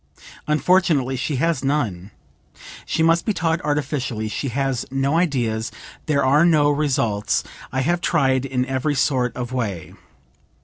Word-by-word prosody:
Unfortunately 150 -3 +2
she 140 +3 -2
has 155 0 0
none; 110 -10 -1 0.8
she 160 - 0
must 165 +1 +3
be 215 - -1
taught 165 0 0
artificially; 140 -7 -2
she 110 +6 -3
has 135 0 -1
no 135 +3 0
ideas, 120 -10 0 0.4
there 140 -3 +2
are 145 +4 +4
no 150 -4 +4
results, 120 -7 0 0.3
I 130 -1 0
have 175 +5 0
tried 135 -7 +2
in 130 -2 -1
every 135 +3 -1
sort 130 -3 +1
of 125 0 -5
way. 105 -9 -3
135 Hz, 140 wpm, -21 LUFS, 125-155 Hz, 0.8 s, are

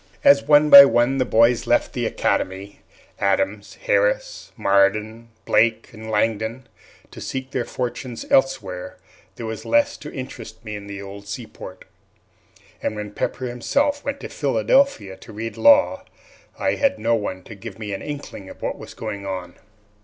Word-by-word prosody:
As 140 0 +7
one 150 +1 +4
by 140 0 +13
one 135 0 +2
the 130 - +2
boys 115 0 +3
left - - +2
the - - -1
academy 95 +2 -2 0.4
Adams, 100 +1 -1
Harris, - - 0
Marden, 105 +4 +1 0.2
Blake, 115 0 +2
and 110 0 -9
Langdon 110 +3 -1 0.4
to - - -10
seek 130 0 -5
their 125 -3 -2
fortunes 125 0 -5
elsewhere, 110 -10 0 0.4
there 115 - -7
was 110 0 -5
less 290 0 +2
to 150 - -9
interest 115 -3 -9
me 105 -1 -5
in 100 -1 -9
the 100 0 -7
old 100 +1 -10
seaport; 100 -3 -9 1.0
and - - -2
when 105 -1 -6
Pepper 130 - -3
himself 285 - -1
went 280 0 -4
to - - -5
Philadelphia 135 - +1
to 115 - -13
read 115 +2 -6
law, 285 0 +4 0.5
I - - 0
had 280 0 +1
no 115 - 0
one 95 -4 -3
to 110 - -11
give 105 0 -10
me 105 -2 -5
an 95 - -5
inkling 140 -9 -7
of - - -12
what - - -3
was - - -11
going 100 -1 -6
on. 90 -2 -5
115 Hz, 160 wpm, -22 LUFS, 100-135 Hz, 1.0 s, by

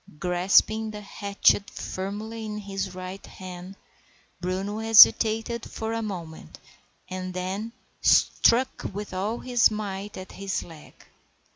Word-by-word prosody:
Grasping 185 +6 +2
the 210 -1 -7
hatchet 200 0 +1
firmly 210 +4 -6
in 210 -1 -5
his 195 -2 -5
right 185 +1 -7
hand, 185 0 -10 0.6
Bruno 190 +4 -3
hesitated 225 +1 +5
for 225 0 -4
a 230 - -2
moment, 170 - -7 0.5
and 185 0 -6
then 190 +5 -3 0.3
struck 255 +3 +3
with 205 -1 -6
all 205 +5 -2
his 245 -2 +3
might 205 -1 -5
at 185 0 -9
his 195 0 -3
leg. 160 -3 -14
200 Hz, 120 wpm, -26 LUFS, 185-220 Hz, 0.6 s, hesitated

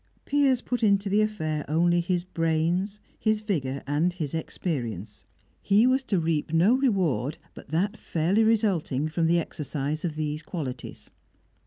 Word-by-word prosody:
Piers 275 -3 +3
put 245 -1 -2
into 200 -2 +3
the 205 +2 +3
affair 155 -9 -1
only 175 +3 +3
his 175 0 -1
brains, 175 +4 0 0.2
his 215 -1 +1
vigour, 140 -11 -2
and 150 +5 +1
his 155 -6 -4
experience; 120 - -4 0.4
he 205 +3 +4
was 260 +1 +3
to 195 -7 +1
reap 160 -2 -1
no 170 +8 +4
reward 185 - +1 0.2
but - - -13
that 195 +8 0
fairly 175 +7 +1
resulting 195 - +1
from 165 +1 0
the 170 +1 +3
exercise 150 -2 -3
of 165 -4 -2
these 155 0 -2
qualities. 145 -6 -6
170 Hz, 150 wpm, -26 LUFS, 155-205 Hz, 0.4 s, he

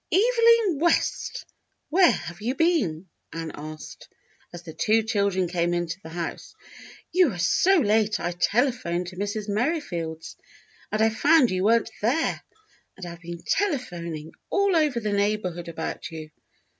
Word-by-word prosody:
"Evelyn 460 - +4
West, 340 +2 0 0.4
where 360 +1 +6
have 175 -2 -6
you 245 +5 -1
been.^^" 265 - +1 0.3
Ann 165 -1 -5
asked, 155 +1 -9 0.4
as 175 0 -9
the 160 -2 -9
two 220 +7 +2
children 200 -4 0
came 175 0 0
into 175 +1 -3
the 160 - -10
house. 170 0 -6 0.6
"You 360 -2 +4
were 195 - -6
so 350 - +3
late 215 -5 +2
I 175 - -2
telephoned 190 -2 0
to 180 - -13
Mrs. 205 +1 -3
Merrifield's 200 - -3 0.5
and 215 +1 +1
I 220 - +4
found 275 +2 +4
you 185 +1 0
weren't 230 +1 +3
there, 260 +10 0 0.6
and 190 - -7
I've 170 0 -9
been 170 0 -8
telephoning 175 - -2 0.2
all 395 -1 +2
over 300 -7 +2
the 210 -2 -2
neighborhood 200 -4 -1
about 160 -1 -5
you." 155 -2 -9
205 Hz, 145 wpm, -25 LUFS, 170-280 Hz, 0.6 s, where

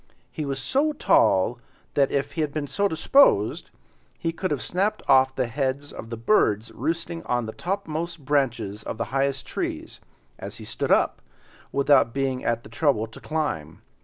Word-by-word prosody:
He 155 - -4
was 135 -1 -2
so 280 - +1
tall 115 - +3 0.3
that, 140 -2 +3
if 140 0 -1
he 160 - -2
had 150 -2 -1
been 150 0 -3
so 170 +9 0
disposed, 160 - +3 0.5
he 165 - -1
could 185 +3 -3
have 145 - -1
snapped 200 +4 -1
off 130 -1 +5
the 130 - +1
heads 135 +3 -2
of 115 - -8
the 115 - -5
birds 115 - +2
roosting 165 +6 -3
on 120 -1 0
the 110 - -5
topmost 165 - -4
branches 125 -8 0
of 110 - -6
the 115 - -1
highest 135 0 0
trees, - - -4 0.4
as - - -7
he - - -9
stood - - -3
up, - - +3 0.5
without 140 -4 +3
being 135 -2 -1
at 115 0 0
the - - -12
trouble 135 -9 +1
to 115 - -13
climb. 145 - -3
140 Hz, 175 wpm, -25 LUFS, 120-160 Hz, 0.5 s, off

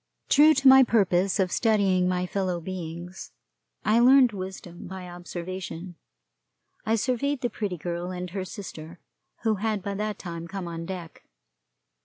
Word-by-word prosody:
True 305 +2 +6
to 270 0 +3
my 265 0 +9
purpose 200 -5 +2
of 185 -2 +1
studying 195 -5 +2
my 180 0 0
fellow 185 -2 -2
beings, 175 0 -7 0.5
and 225 +3 +4
learning 260 -1 +7
wisdom 185 -2 -7
by 190 -1 -7
observation, 175 0 -7 0.9
I 225 - +3
surveyed 255 +4 -1
the 240 - -1
Pretty 200 -4 -3
Girl 175 +2 -4
and 180 -1 -5
her 190 0 -3
sister, 175 -4 -9 0.4
who 220 -2 +2
had 210 -1 -1
by 200 - -3
that 210 +1 -3
time 170 -2 -7
come 190 0 -5
on 165 0 -6
deck. 180 -4 -8
190 Hz, 150 wpm, -26 LUFS, 175-215 Hz, 0.9 s, my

